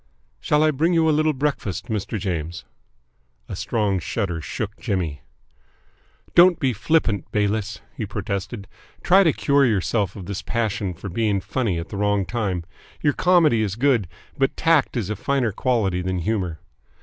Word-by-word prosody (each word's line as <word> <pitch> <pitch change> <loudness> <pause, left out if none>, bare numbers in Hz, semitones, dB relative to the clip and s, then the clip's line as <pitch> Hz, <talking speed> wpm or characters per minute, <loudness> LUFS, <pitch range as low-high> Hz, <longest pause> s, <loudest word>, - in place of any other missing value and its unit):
"Shall 150 +1 +2
I 155 - +4
bring 160 +5 +1
you 165 -1 +4
a - - +4
little 155 +1 +3
breakfast, 135 - -2
Mr. 110 -2 -3
James?" 85 -3 -4 0.8
A - - -5
strong 105 -4 0
shudder 90 0 -2
shook 105 +8 -4
Jimmy. 90 -9 -2 1.1
"Don't 175 0 +6
be 130 -3 +1
flippant, 110 -2 0
Bayliss," 105 +1 -1
he 110 - -4
protested. 100 +1 -4 0.4
"Try 190 +2 +6
to 165 - +4
cure 140 0 +2
yourself 100 - +1
of 95 -4 -8
this 100 +1 -4
passion 105 -5 -2
for 95 +4 -8
being 105 +1 0
funny 100 0 -1
at 85 - -5
the 100 - -6
wrong 100 -1 +1
time. 95 -4 -2 0.4
Your 145 - +3
comedy 165 -11 +4
is 100 -3 -1
good, 120 -5 +2 0.3
but 135 - +1
tact 165 -6 +2
is 105 -3 -2
a - - -1
finer 130 +2 0
quality 100 -6 0
than 95 0 -2
humour. 90 -4 -2
105 Hz, 160 wpm, -23 LUFS, 95-135 Hz, 1.1 s, Don't